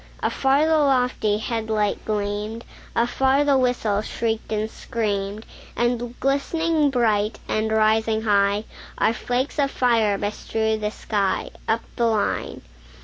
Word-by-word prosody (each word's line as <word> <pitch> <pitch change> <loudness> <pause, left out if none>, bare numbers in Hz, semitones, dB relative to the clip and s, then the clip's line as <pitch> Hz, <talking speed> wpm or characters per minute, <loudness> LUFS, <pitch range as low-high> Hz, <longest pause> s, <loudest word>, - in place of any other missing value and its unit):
Afar 275 +3 +2
the 320 -1 +3
lofty 250 -7 +2
head 220 0 -3
light 210 -2 0
gleamed; 210 +2 -3 0.3
Afar 265 +4 +2
the 285 -1 +3
whistle 245 -5 +1
shrieked 225 0 -3
and 215 0 0
screamed; 210 -2 -3 0.3
And 240 0 -1
glistening 300 +3 +1
bright, 220 -5 +1
and 220 0 0
rising 220 0 +2
high, 200 -1 +2 0.3
Our 225 - +2
flakes 250 +5 -2
of 280 -1 +3
fire 230 -6 +2
bestrewed 220 +1 -2
the 210 - 0
sky, 200 -3 -1 0.2
Up 225 +1 +1
the 235 - +2
line. 220 -2 -1
225 Hz, 130 wpm, -23 LUFS, 210-250 Hz, 0.3 s, the